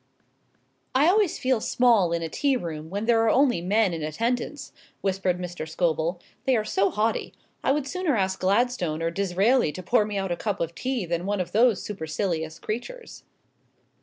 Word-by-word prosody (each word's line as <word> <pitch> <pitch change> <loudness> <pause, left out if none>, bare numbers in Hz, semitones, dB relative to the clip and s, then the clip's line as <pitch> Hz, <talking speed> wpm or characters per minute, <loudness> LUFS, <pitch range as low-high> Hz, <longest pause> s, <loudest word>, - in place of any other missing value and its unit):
"I 275 +3 +5
always 395 -1 +3
feel 255 -3 +1
small 225 -9 +3
in 170 0 -1
a - - -2
tea 275 - +1
room 160 -6 -6
when 200 +4 -3
there 230 -1 +4
are 225 - +3
only 250 -7 +3
men 200 +1 +2
in 165 - -4
attendance," 235 - -2 0.3
whispered 190 -2 0
Mr. 175 -3 -6
Scobel, 165 +1 0 0.3
"they 265 - +3
are 215 - -1
so 200 -2 +2
haughty. 220 +2 -1 0.3
I - - +3
would 290 0 0
sooner 360 -3 0
ask 190 -1 0
Gladstone 185 -5 +1
or 165 - 0
Disraeli 195 +3 +2
to 185 - -7
pour 215 +4 +3
me 210 -1 -4
out 195 -2 -2
a - - +1
cup 205 +2 -3
of 165 0 -2
tea 255 0 -2
than 170 +2 -2
one 205 -1 0
of 180 - -3
those 230 -1 +3
supercilious 160 -3 -3
creatures." 465 - -6
200 Hz, 185 wpm, -25 LUFS, 175-245 Hz, 0.3 s, I